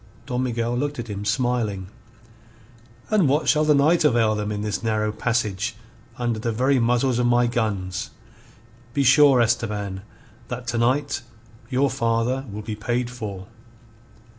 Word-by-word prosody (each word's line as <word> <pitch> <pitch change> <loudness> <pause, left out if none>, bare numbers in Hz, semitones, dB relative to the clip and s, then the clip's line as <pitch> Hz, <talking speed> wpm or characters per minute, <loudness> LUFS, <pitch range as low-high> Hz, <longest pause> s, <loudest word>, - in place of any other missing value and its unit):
Don 125 0 -2
Miguel 120 -1 -1
looked 145 +3 -2
at 120 -1 -6
him, 100 0 -4
smiling. 110 -3 0 1.3
"And 200 -9 +4
what 150 +3 +1
shall 155 0 +4
the 150 -1 +4
night 155 +5 +4
avail 115 -6 +3
them 105 0 -2
in 105 0 -3
this 105 -2 -2
narrow 110 -1 0
passage, 110 -2 -1 0.4
under 120 -2 -1
the 115 +1 -1
very 130 +4 +2
muzzles 125 +1 +2
of 120 - +2
my 120 0 +4
guns? 105 -6 -2 0.9
Be 140 - +2
sure, 140 0 +6
Esteban, 105 -4 -1 0.5
that 125 0 -6
to 120 - -1
night 130 +3 +1 0.5
your 135 +1 +1
father 120 +1 0
will 105 +1 -6
be 110 0 -4
paid 120 +3 -2
for." 105 -6 -6
120 Hz, 150 wpm, -23 LUFS, 105-130 Hz, 1.3 s, sure